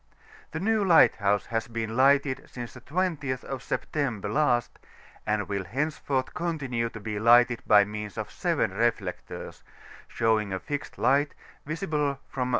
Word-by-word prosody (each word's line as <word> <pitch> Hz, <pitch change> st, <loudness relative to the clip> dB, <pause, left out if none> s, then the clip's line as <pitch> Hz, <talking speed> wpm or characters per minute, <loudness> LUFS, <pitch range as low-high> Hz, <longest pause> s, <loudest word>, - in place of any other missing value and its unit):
The 160 Hz, -, -5 dB
new 215 Hz, +3 st, +2 dB
lighthouse 105 Hz, -, +4 dB
h^ 115 Hz, 0 st, -3 dB
been 115 Hz, -1 st, -3 dB
lighted 140 Hz, +1 st, +3 dB
since 120 Hz, -2 st, -7 dB
the 130 Hz, -, -12 dB
20th 150 Hz, -4 st, -2 dB
of 135 Hz, -2 st, -5 dB
September 120 Hz, -9 st, -2 dB
last, 120 Hz, -2 st, +1 dB, 0.5 s
and 105 Hz, -1 st, 0 dB
will 100 Hz, -2 st, -3 dB
henceforth 135 Hz, -, -2 dB
continue 140 Hz, -10 st, -2 dB
to 115 Hz, -, -9 dB
be 105 Hz, 0 st, -4 dB
lighted 120 Hz, +2 st, +5 dB
by 105 Hz, -1 st, +7 dB
means 105 Hz, 0 st, -6 dB
of -, -, -4 dB
seven -, -, 0 dB
reflectors, -, -, -2 dB, 0.5 s
showing 110 Hz, -3 st, +1 dB
a 95 Hz, -, -2 dB
fixed 145 Hz, +6 st, -5 dB
light, 140 Hz, +4 st, +2 dB, 0.3 s
visible 150 Hz, -4 st, -1 dB
from 125 Hz, -2 st, -2 dB
N. -, -, -3 dB
125 Hz, 150 wpm, -27 LUFS, 110-145 Hz, 0.5 s, by